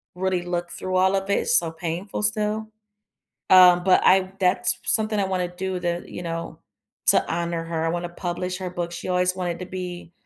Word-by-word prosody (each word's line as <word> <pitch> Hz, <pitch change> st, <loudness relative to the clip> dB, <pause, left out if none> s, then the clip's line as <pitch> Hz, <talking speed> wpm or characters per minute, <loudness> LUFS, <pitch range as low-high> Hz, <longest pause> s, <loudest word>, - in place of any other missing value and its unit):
really 185 Hz, -1 st, -1 dB
look 175 Hz, 0 st, -3 dB
through 185 Hz, 0 st, -4 dB
all 190 Hz, +1 st, +3 dB
of 195 Hz, 0 st, -2 dB
it. 200 Hz, -, +2 dB
It's 240 Hz, -, +3 dB
so 165 Hz, -2 st, 0 dB
painful 170 Hz, +5 st, -4 dB
still, 210 Hz, +1 st, 0 dB, 0.8 s
um, 180 Hz, -1 st, +7 dB
but 185 Hz, -, +5 dB
I 190 Hz, 0 st, +4 dB
that's 180 Hz, -1 st, +2 dB
s -, -, -18 dB
something 215 Hz, -1 st, +1 dB
I 195 Hz, -, +1 dB
wanna 185 Hz, -2 st, -1 dB
do 185 Hz, 0 st, -3 dB
to, 175 Hz, 0 st, -2 dB
you 175 Hz, -, -7 dB
know 165 Hz, 0 st, -5 dB, 0.5 s
to -, -, +5 dB
honor 170 Hz, 0 st, -2 dB
her. 165 Hz, -1 st, -2 dB
I -, -, +1 dB
wanna 175 Hz, +1 st, -3 dB
publish 180 Hz, +1 st, -4 dB
her 185 Hz, -1 st, -5 dB
book. 175 Hz, -1 st, -4 dB
She 175 Hz, +2 st, -6 dB
always 180 Hz, 0 st, +1 dB
wanted 175 Hz, -2 st, -3 dB
to 180 Hz, -, -5 dB
be 180 Hz, -2 st, -7 dB
180 Hz, 205 wpm, -24 LUFS, 175-190 Hz, 0.8 s, um